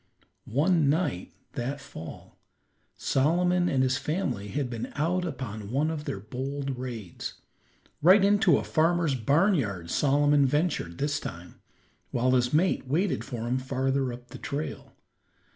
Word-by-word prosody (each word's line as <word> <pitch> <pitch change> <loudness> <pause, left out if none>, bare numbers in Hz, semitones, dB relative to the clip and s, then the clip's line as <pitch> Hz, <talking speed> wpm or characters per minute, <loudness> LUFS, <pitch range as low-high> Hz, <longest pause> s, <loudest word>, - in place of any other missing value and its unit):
One 150 +4 +3
night 145 - 0 0.2
that 135 +4 -3
fall, 80 - -10 0.6
Solomon 175 +5 +2
and 130 -1 +2
his 130 0 +1
family 140 - -2
had 135 +5 -2
been 115 -2 -5
out 175 +5 0
upon 115 - -5
one 145 +6 +1
of 150 -2 -5
their 95 - -3
bold 135 +5 -4
raids. 115 -8 -6 0.7
Right 190 +5 +7
into 200 -6 +5
a - - -2
farmer's 165 -1 +2
barn 145 - +3
yard 100 - -2
Solomon 145 0 +3
ventured 145 - 0
this 145 +1 0
time, 85 -6 -9 0.5
while 125 +1 +1
his 125 -1 +2
mate 160 -2 +2
waited 170 +8 0
for 120 -4 -5
him 125 +2 +1
farther 130 0 0
up 120 0 -10
the - - -9
trail. 145 +3 -5
140 Hz, 145 wpm, -28 LUFS, 125-160 Hz, 0.7 s, Right